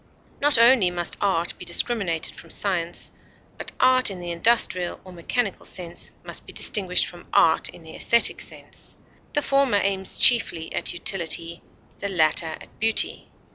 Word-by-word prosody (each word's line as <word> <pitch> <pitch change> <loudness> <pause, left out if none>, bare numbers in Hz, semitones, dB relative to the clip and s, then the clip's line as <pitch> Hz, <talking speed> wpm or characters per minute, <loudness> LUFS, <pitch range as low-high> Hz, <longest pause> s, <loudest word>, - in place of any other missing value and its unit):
Not 290 -2 +4
only 230 -5 +5
must 175 -1 -4
art 175 -4 0
be - - -8
discriminated 195 -9 0
from - - -14
science, 175 -4 -1 0.4
but - - -7
art 255 -1 +4
in 190 -2 -7
the 175 -1 -6
industrial 180 -1 0
or 185 - -13
mechanical 200 +5 -3
sense 175 -2 -6
must - - -6
be - - -8
distinguished 185 -3 +2
from 175 -1 -12
art 160 -1 +3
in 170 - -13
the 160 - -12
esthetic 235 0 +4
sense; - - -6 0.4
the 295 - 0
former 275 -6 +2
aims 195 -1 -1
chiefly 200 -9 +3
at - - -1
utility, 170 -2 -1 0.4
the 200 - -4
latter 160 -3 +1
at 160 - -11
beauty. 225 0 +1
190 Hz, 155 wpm, -23 LUFS, 170-230 Hz, 0.4 s, only